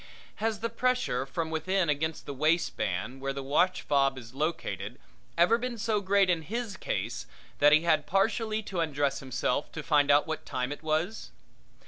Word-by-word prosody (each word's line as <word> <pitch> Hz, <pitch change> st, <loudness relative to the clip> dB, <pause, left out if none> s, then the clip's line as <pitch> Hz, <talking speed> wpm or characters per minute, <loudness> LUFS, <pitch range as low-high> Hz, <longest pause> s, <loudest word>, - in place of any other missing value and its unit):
Has 220 Hz, -1 st, -1 dB
the 230 Hz, -, -1 dB
pressure 230 Hz, -, 0 dB
from 160 Hz, +3 st, -3 dB
within 185 Hz, +3 st, 0 dB
against 155 Hz, +2 st, -1 dB
the 140 Hz, -, -5 dB
waistband 135 Hz, -, 0 dB
where 135 Hz, 0 st, -2 dB
the 135 Hz, 0 st, -5 dB
watchfob 140 Hz, -2 st, +2 dB
is 115 Hz, -1 st, -10 dB
located 155 Hz, +4 st, -3 dB, 0.4 s
ever 180 Hz, +8 st, +5 dB
been 250 Hz, -1 st, -3 dB
so 215 Hz, -1 st, 0 dB
great 200 Hz, 0 st, +3 dB
in 175 Hz, -3 st, +2 dB
his 220 Hz, +4 st, -4 dB
case 115 Hz, -, -3 dB, 0.3 s
that 145 Hz, +1 st, +6 dB
he 155 Hz, +1 st, +6 dB
had 155 Hz, -3 st, +2 dB
partially 215 Hz, +3 st, +1 dB
to 190 Hz, -3 st, -4 dB
undress 145 Hz, -4 st, 0 dB
himself 130 Hz, +1 st, -1 dB
to 155 Hz, -, -5 dB
find 145 Hz, -1 st, +3 dB
out 145 Hz, +1 st, +5 dB
what 160 Hz, 0 st, -4 dB
time 125 Hz, +1 st, -3 dB
it 145 Hz, -, -6 dB
was? 160 Hz, +7 st, -1 dB
160 Hz, 170 wpm, -29 LUFS, 140-195 Hz, 0.4 s, that